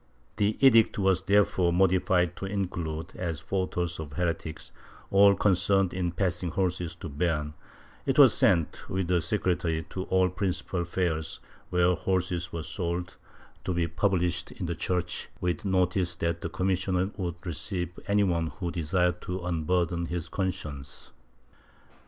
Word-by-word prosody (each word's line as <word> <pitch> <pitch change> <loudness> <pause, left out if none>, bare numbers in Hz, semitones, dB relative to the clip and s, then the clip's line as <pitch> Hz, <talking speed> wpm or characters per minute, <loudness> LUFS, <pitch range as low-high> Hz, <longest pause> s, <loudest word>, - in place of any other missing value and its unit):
The 105 0 +1
edict 115 -4 +6
was 95 -2 +2
therefore 95 -3 +3
modified 90 -1 +2
to 95 - -4
include, 85 -5 -3
as 85 -4 -3
fautors 90 0 -2
of 75 -2 -7
heretics, 85 -1 -3 0.4
all 100 0 +7
concerned 95 -1 +2
in 90 -2 -1
passing 90 0 -1
horses 90 -1 -1
to 85 - -8
Beam; 75 -1 -1 0.5
it - - +1
was - - +8
sent, 85 -5 +2
with 95 -2 -1
a 90 -1 +3
secretary, 85 -4 0
to 95 0 -4
all 95 0 +3
the - - -13
principal 90 -2 -2
fairs 85 -3 -2 0.3
where 90 0 +3
horses 90 -1 -1
were 85 -1 -4
sold, 85 +2 -3 0.5
to 90 - -2
be 85 -1 +1
published 90 0 0
in 90 - -5
the 85 - -1
church, 90 +2 -2
with 90 0 -2
notice 90 -1 +1
that 85 0 -2
the 85 - -3
commissioner 95 +1 0
would 90 -4 -3
receive 90 +1 -3
any 100 0 +3
one 85 -4 +1
who 90 0 -4
desired 90 +2 0
to 90 +1 -4
unburden 85 0 0
his 85 0 -4
conscience. 75 -9 -5
90 Hz, 145 wpm, -28 LUFS, 85-95 Hz, 0.5 s, was